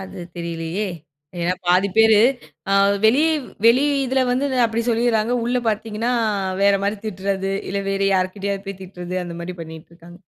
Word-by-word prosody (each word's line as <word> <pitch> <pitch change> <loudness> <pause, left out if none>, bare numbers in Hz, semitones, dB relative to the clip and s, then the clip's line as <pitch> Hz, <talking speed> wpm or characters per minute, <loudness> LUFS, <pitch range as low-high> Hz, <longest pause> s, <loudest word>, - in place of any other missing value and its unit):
அது 190 -1 -9 0.2
தெரியலயே! 170 +4 -3 0.5
ஏன்னா 170 +1 +1
பாதி 180 +3 +3
பேரு, 220 -1 +6 0.5
ஆ - - +2 0.3
வெளியே 285 +9 +4 0.4
வெளி 245 +4 +6 0.2
இதில 265 +1 +1
வந்து 260 +3 +1
அந்த 260 -1 -1
அப்பிடி 230 0 0
சொல்லிர்றாங்க. 230 -1 +1
உள்ள 245 +1 0
பார்த்தீங்கன்னா, 220 +2 -2 0.5
வேறமாரி 200 +1 +2
திட்றது, 195 -1 -2 0.2
இல்ல 200 0 -1
வேற 195 0 -2
யார்கிட்டயாவது 195 +1 -2
போய் 195 -1 -7
திட்றது, 180 -1 -7
அந்தமாரி 170 +1 -6
பண்ணிட்டு 160 -1 -10
இருக்காங்க. 170 +1 -15
200 Hz, 145 wpm, -21 LUFS, 180-225 Hz, 0.5 s, பேரு